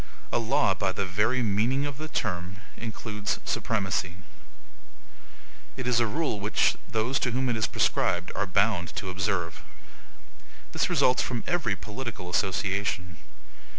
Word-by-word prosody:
A - - +2
LAW, 115 -2 +3
by 95 0 0
the 100 +1 -2
very 105 +7 +1
meaning 115 +7 +2
of 145 0 -5
the 155 - -4
term, 90 - -2 0.2
includes 110 -2 -3
supremacy. 95 -5 0 1.6
It 130 - -3
is 125 -1 +3
a 120 - +3
rule 145 -3 -1
which 105 +2 +3
those 115 +5 +1
to 125 - +1
whom 130 +2 0
it 120 - +1
is 110 - +1
prescribed 90 +1 +1
are 100 - -1
bound 95 -4 +2
to 95 -3 -3
observe. 90 -3 -1 1.1
This - - +1
results 125 - +4
from 120 -3 -2
every 160 - +1
political 105 -1 -6
association. 95 -2 0
105 Hz, 140 wpm, -28 LUFS, 95-120 Hz, 1.6 s, results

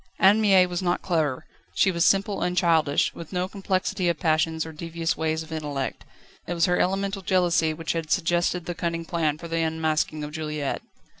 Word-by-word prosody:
Anne 200 +3 +5
Mie 195 -3 +6
was 180 0 -3
not 175 -1 0
clever; 155 -7 0 0.3
she 195 - +4
was 170 -2 +1
simple 195 +2 +2
and 180 0 -1
childish, 160 -4 +2
with 165 - -10
no 180 -1 -1
complexity 190 -1 -1
of 170 -3 -1
passions 160 0 +1
or 160 - -7
devious 165 +1 -2
ways 160 0 -1
of 160 - -14
intellect. 145 -4 -4 0.4
It 175 - -2
was 170 - +3
her 180 -1 +1
elemental 195 +1 0
jealousy 175 -4 +2
which 160 0 -3
suggested 175 0 +1
the 175 - -3
cunning 170 -1 -3
plan 160 -4 0
for 170 - -8
the 165 0 -1
unmasking 160 -1 -1
of 150 - -5
Juliette. 150 -2 -3
170 Hz, 190 wpm, -25 LUFS, 160-180 Hz, 0.4 s, Mie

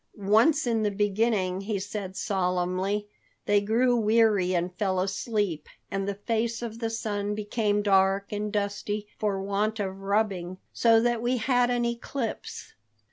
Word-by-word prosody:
"Once 225 +10 +3
in 230 -2 +1
the 210 - +2
beginning," 200 -2 0
he 205 +1 -2
said 195 -1 -5
solemnly, 185 +1 -1 0.4
"they 205 0 +3
grew 240 +4 +2
weary 215 -5 +3
and 175 +1 -1
fell 190 -1 0
asleep, 195 -3 -2 0.2
and 195 0 -2
the 200 - -2
face 230 +3 -2
of 230 -1 -6
the 225 -1 -1
sun 210 -2 -2
became 210 -1 0
dark 195 0 +3
and 210 0 -3
dusty 205 0 -2
for 205 -2 0
want 205 +3 -1
of 190 -1 -3
rubbing, 195 -3 -1 0.2
so 230 -1 +5
that 240 0 +1
we 245 +2 +1
had 245 +1 +2
an 245 -1 +1
eclipse." 235 0 -4
205 Hz, 150 wpm, -27 LUFS, 195-225 Hz, 0.4 s, so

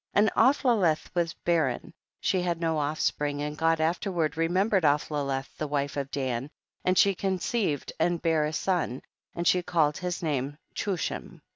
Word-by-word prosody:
8. - - +2
And 205 0 +5
Aphlaleth 230 - +3
was 170 -2 0
barren, 170 -2 0 0.3
she 185 - +1
had 175 -2 -1
no 165 -2 0
offspring, 145 -1 -1
and 150 0 -3
God 165 +1 +2
afterward 165 -1 0
remembered 185 +5 +2
Aphlaleth 145 -2 0
the 155 - -1
wife 140 -1 -1
of 140 -1 -3
Dan, 130 -1 -2 0.3
and 185 0 +2
she 200 - +5
conceived 190 - -1
and 170 +1 +2
bare 160 -2 +2
a 150 - -2
son, 165 -7 -1 0.3
and 170 0 -1
she 180 - +4
called 165 -4 +1
his 180 -1 -3
name 145 -2 -1 0.2
Chus 190 -5 -1
him. - - -8
165 Hz, 165 wpm, -28 LUFS, 150-180 Hz, 0.3 s, And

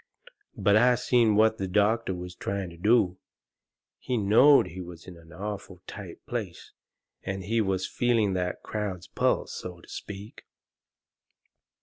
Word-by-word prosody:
But 100 - +3
I 125 +2 +5
seen 120 -3 +3
what 110 +1 +4
the 95 - -2
doctor 105 +1 +1
was 90 0 -7
trying 95 -1 -4
to - - -12
do. 95 -2 +3 0.8
He 125 - -2
knowed 115 +8 +6
he 90 +3 -7
was 85 -2 -10
in 90 - -10
an 85 -1 -17
awful 95 0 -7
tight - - -10
place, - - -5 0.5
and 95 0 -4
he 115 +4 +1
was 95 -2 0
feeling 115 -4 +1
that 90 -1 -2
crowd's 100 -4 -4
pulse, - - 0
so 90 -1 -7
to - - -18
speak. 105 +1 -9
100 Hz, 145 wpm, -27 LUFS, 90-110 Hz, 0.8 s, knowed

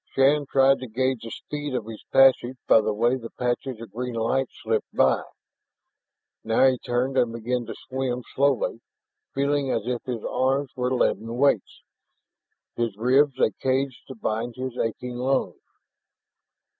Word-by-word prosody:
Shann 140 +2 +4
tried 135 0 +4
to 130 - -6
gauge 130 +1 -1
the 115 - -7
speed 145 +2 -5
of 120 -4 -2
his 110 -1 -9
passage 130 -1 +5
by 110 - +6
the 110 - 0
way 120 +5 +2
the 115 -2 -8
patches 125 0 -3
of 115 - -10
green 125 +1 -4
light 125 +4 +1
slipped 110 -3 -2
by. 65 -1 +3 1.2
Now 115 +4 +3
he 130 -2 +3
turned 130 +2 0
and 120 -2 +2
began 120 +1 -3
to - - -6
swim 130 -2 -2
slowly, 135 -4 +1 0.5
feeling 140 0 +1
as 115 -4 -1
if 125 -1 -2
his 120 -4 -4
arms 135 +1 0
were 125 0 -1
leaden 115 -2 0
weights, 135 -7 +1 0.9
his 115 -4 -2
ribs 130 +4 +3
a - - +3
cage 130 0 0
to 130 - -8
bind 115 +1 -3
his 130 -1 -5
aching 125 +1 -3
lungs. 130 +2 -1
125 Hz, 155 wpm, -25 LUFS, 115-135 Hz, 1.2 s, by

